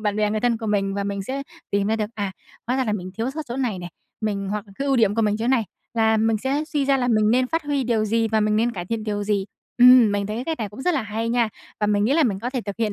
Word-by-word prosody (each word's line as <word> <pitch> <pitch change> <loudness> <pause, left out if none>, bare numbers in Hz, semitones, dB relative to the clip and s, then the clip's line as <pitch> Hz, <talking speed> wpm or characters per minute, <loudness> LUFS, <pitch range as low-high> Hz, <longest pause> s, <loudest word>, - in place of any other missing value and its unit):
bạn 210 -1 0
bè 210 -1 +1
người 215 0 -1
thân 235 -1 +1
của 225 - -5
mình 195 -2 0
và 200 - -2
mình 200 -1 -3
sẽ 270 +6 -4 0.3
tìm 200 0 +1
ra 220 - +1
được, 215 0 -2
à, 200 -3 -3 0.3
hóa 250 +2 0
ra 260 - +1
là 215 - -1
mình 185 -3 -4
thiếu 230 +3 -1
sót 305 +3 -5
chỗ 240 - -4
này 240 -8 -1
nè, 175 -1 -6 0.3
mình 200 -2 -2
hoặc 210 0 -3
cái 275 - -2
ưu 270 -1 +2
điểm 215 -3 +3
của 225 - +1
mình 210 0 +2
chỗ 230 +2 -1
này 255 -4 +3 0.3
là 220 -1 +3
mình 220 0 +2
sẽ 275 +6 -1
suy 295 -3 -1
ra 275 0 +3
là 250 -1 0
mình 215 -2 +3
nên 255 +2 +3
phát 330 +4 -1
huy 285 -3 0
điều 225 -2 +1
gì 225 +1 +1
và 220 0 +2
mình 210 0 +2
nên 235 +2 +2
cải 175 -2 -5
thiện 225 0 -3
điều 205 -1 -2
gì. 200 -2 0 0.3
Ừm, 245 -3 +8
mình 200 0 -1
thấy 215 +2 -4
cái 245 - -3
cách 320 -1 -3
này 215 - -3
cũng 210 +7 -9
rất 360 0 +2
là 275 - 0
hay 220 +2 -3
nha, 235 -1 +2 0.3
và 210 - +2
mình 205 0 +2
nghĩ 250 - +2
là 325 - +4
mình 200 -5 0
có 245 +3 -3
thể 255 -2 -2
thực 200 0 -6
hiện 220 -2 0
220 Hz, 325 wpm, -23 LUFS, 210-250 Hz, 0.3 s, Ừm